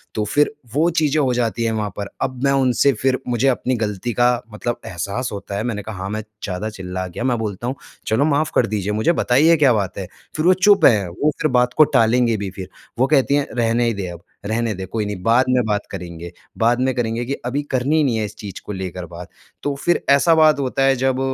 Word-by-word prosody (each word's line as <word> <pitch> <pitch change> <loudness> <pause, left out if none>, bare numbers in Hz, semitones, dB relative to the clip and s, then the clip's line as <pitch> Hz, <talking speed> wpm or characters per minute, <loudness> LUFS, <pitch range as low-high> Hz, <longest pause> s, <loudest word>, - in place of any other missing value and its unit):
तो 105 - 0
फ़िर 145 +8 +1 0.2
वो 160 +4 +3
चीज़ें 155 0 +1
हो 130 -3 +1
जाती 120 -1 -1
है 115 - +1
वहाँ 105 -2 -2
पर। 100 -1 -4
अब 130 0 -3
मैं 140 - +3
उनसे 135 0 +3
फ़िर 130 +3 0
मुझे 120 +2 +1
अपनी 130 0 +1
ग़लती 110 0 -3
का 120 +2 +3 0.2
मतलब 120 +3 -3
एहसास 100 +8 -3
होता 100 0 -5
है। 105 - -2
मैंने 115 -4 -3
कहा 110 0 -7
हाँ, 95 +1 -5
मैं 110 +1 -3 0.2
ज़्यादा 95 +3 -3
चिल्ला 95 -3 -5
गया 95 +6 -6
मैं 125 -2 +1
बोलता 110 +1 -4
हूँ 130 - -2 0.3
चलो 115 +6 +2
माफ़ 150 0 +1
कर - - +3
दीजिए 105 -1 -2
मुझे। 110 +10 +2
बताइए 160 +3 +4
क्या 140 -5 +4
बात 100 -4 -2
है? 95 -2 -5 0.3
फ़िर 155 - -1
वो 185 - +7
चुप 195 -1 +4
है 105 -5 +4
वो 145 - 0
फ़िर 155 - +1
बात 125 0 +2
को 155 - +9
टालेंगे 115 0 +3
भी 100 -1 -4
फ़िर। 95 -1 -8 0.3
वो 130 - +4
कहती 140 -1 +3
हैं, 145 -1 0
"रहने 120 0 +1
ही 115 - +1
दे, 100 -2 -4
अब 85 -1 -9 0.2
रहने 110 +1 -1
दे 95 +1 -6
कोई 105 +3 -3
नहीं 100 -3 -5
बाद 120 +4 +4
में 125 -1 +3
बात 105 -1 -1
करेंगे। 85 -2 -7 0.3
बाद 120 +2 +3
में 130 0 +1
करेंगे 120 -1 -1
कि 135 - -2
अभी 135 +4 -1
करनी 130 +4 +1
ही 155 - +3
नहीं 130 -5 +1
है 110 - -1
इस 105 - -9
चीज़ 100 -3 -8
को - - -6
लेकर 90 -1 -5
बात।" 85 +1 -10 0.3
तो 145 -1 -1
फ़िर 175 +5 0
ऐसा 140 +4 +5
बात 155 -2 +5
होता 135 0 0
है 135 0 +4
जब 130 0 0
120 Hz, 245 wpm, -20 LUFS, 105-135 Hz, 0.3 s, को